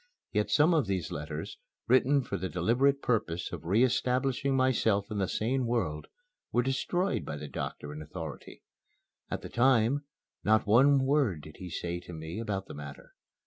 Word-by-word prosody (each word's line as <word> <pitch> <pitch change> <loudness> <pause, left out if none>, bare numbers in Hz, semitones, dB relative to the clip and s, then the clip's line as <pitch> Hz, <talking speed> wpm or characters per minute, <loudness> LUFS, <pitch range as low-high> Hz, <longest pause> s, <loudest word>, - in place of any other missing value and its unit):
Yet - - 0
some 155 +3 +4
of 150 -9 +2
these 95 -4 -2
letters, 75 +1 -5 0.3
written 130 +3 +4
for 100 - -4
the 95 0 -3
deliberate 125 +11 +2
purpose 95 -8 -1
of - - -7
re 100 +8 +3
establishing 130 +1 +1
myself 115 -6 +2
in 105 - -2
the 95 - +1
sane 125 +6 0
world, 90 -11 -1 0.4
were 120 - +2
destroyed 175 +9 0
by 75 - -5
the 75 0 -6
doctor 75 +1 -5
in 75 - -7
authority. 75 -1 -8 0.7
At - - -4
the - - -6
time, 130 +2 +3 0.4
not 110 +1 +3
one 130 +5 +5
word 135 - +2
did 75 0 -12
he 90 - -7
say 85 0 -3
to 90 0 -11
me 80 +4 -6
about 100 -4 -3
the - - -9
matter. 70 -1 -10
110 Hz, 175 wpm, -30 LUFS, 85-130 Hz, 0.7 s, one